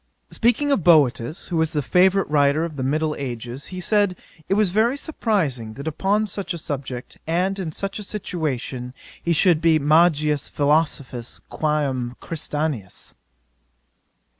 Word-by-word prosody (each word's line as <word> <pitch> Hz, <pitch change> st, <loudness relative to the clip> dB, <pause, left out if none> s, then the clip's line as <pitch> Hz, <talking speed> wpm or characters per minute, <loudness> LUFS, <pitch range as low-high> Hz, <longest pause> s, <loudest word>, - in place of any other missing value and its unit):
'Speaking 245 Hz, +5 st, +2 dB
of 220 Hz, -, +2 dB
Boetius, 150 Hz, -3 st, +3 dB
who 175 Hz, -, -1 dB
was 160 Hz, -1 st, +1 dB
the 150 Hz, -2 st, 0 dB
favourite 190 Hz, +6 st, +3 dB
writer 145 Hz, +2 st, +2 dB
of 160 Hz, -3 st, -7 dB
the 135 Hz, -, -4 dB
middle 155 Hz, +4 st, 0 dB
ages, 125 Hz, 0 st, -5 dB
he 185 Hz, -, -6 dB
said 205 Hz, 0 st, +2 dB, 0.3 s
it 195 Hz, -, +3 dB
was 210 Hz, -3 st, +3 dB
very 230 Hz, +7 st, +2 dB
surprizing, 165 Hz, -, -1 dB
that 140 Hz, +3 st, -7 dB
upon 195 Hz, +7 st, +1 dB
such 195 Hz, -2 st, -3 dB
a -, -, -5 dB
subject, 135 Hz, -5 st, -6 dB
and 185 Hz, +4 st, 0 dB
in 170 Hz, -4 st, -3 dB
such 195 Hz, +6 st, -4 dB
a -, -, -5 dB
situation, 135 Hz, -, -4 dB, 0.3 s
he 170 Hz, -, -1 dB
should 170 Hz, 0 st, +4 dB
be 165 Hz, -1 st, +4 dB
magis 150 Hz, -1 st, +3 dB
philosophius 145 Hz, -5 st, 0 dB
quÃ 150 Hz, -1 st, 0 dB
m 125 Hz, -2 st, -3 dB
Christianus. 150 Hz, -, -4 dB
155 Hz, 150 wpm, -22 LUFS, 140-185 Hz, 0.3 s, should